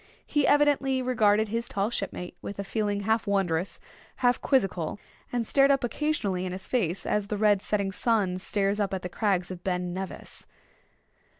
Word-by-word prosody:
He 295 -2 +1
evidently 280 -3 +3
regarded 220 -4 +3
his 230 +2 -2
tall 200 +3 -1
shipmate 180 -5 -4
with 200 - -6
a 200 - -3
feeling 205 0 -1
half 220 +2 0
wondrous, 190 -3 0 0.4
half 245 -1 +2
quizzical; 195 - +1 0.3
and 240 -2 -1
stared 275 +4 +4
up 275 -2 +3
occasionally 235 -8 -1
in 185 -1 -3
his 185 0 -7
face 195 -8 0
as 210 -1 0
the 210 - -2
red 205 -2 +3
setting 200 -2 -1
sun 195 -3 +1
stares 200 +1 0
up 195 -2 0
at 185 - -5
the 180 - -4
crags 190 -2 0
of 180 -1 -8
Ben 180 -1 -1
Nevis. 190 +1 -7
205 Hz, 175 wpm, -27 LUFS, 190-235 Hz, 0.4 s, stared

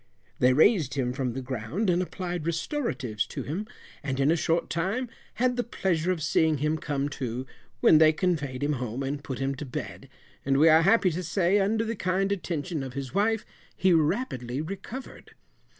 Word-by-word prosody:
They 125 - +5
raised 155 - +4
him 125 -3 0
from 125 -2 -2
the 135 +1 -5
ground, 130 - -3
and 180 0 +3
applied 175 -3 -4
restoratives 135 - -2
to - - -5
him, 185 +9 -4 0.3
and 135 -2 -3
in 140 +3 +4
a - - +4
short 165 0 0
time 200 +10 -1 0.3
had 250 +1 +1
the 245 - +1
pleasure 185 -7 0
of 165 -4 -2
seeing 155 0 +2
him 150 +3 0
come 145 -2 -2
too, 130 -3 -4 0.4
when 155 - +7
they 155 -1 +7
conveyed 150 -6 -1
him 150 +1 +1
home 125 +2 -3
and 140 +1 -3
put 130 - -5
him 135 0 -1
to 140 - -6
bed, 130 -4 -6 0.3
and 135 0 +2
we 160 +3 +6
are 160 +1 +7
happy 195 0 +4
to 170 +3 -3
say 180 +3 +2
under 220 +3 +1
the 230 +1 -2
kind 195 +1 0
attention 170 -4 -2
of 130 -2 -6
his 135 -1 -5
wife 215 +2 +1 0.3
he 185 -1 +4
rapidly 150 - 0
recovered. 195 - -7
160 Hz, 190 wpm, -27 LUFS, 135-190 Hz, 0.4 s, when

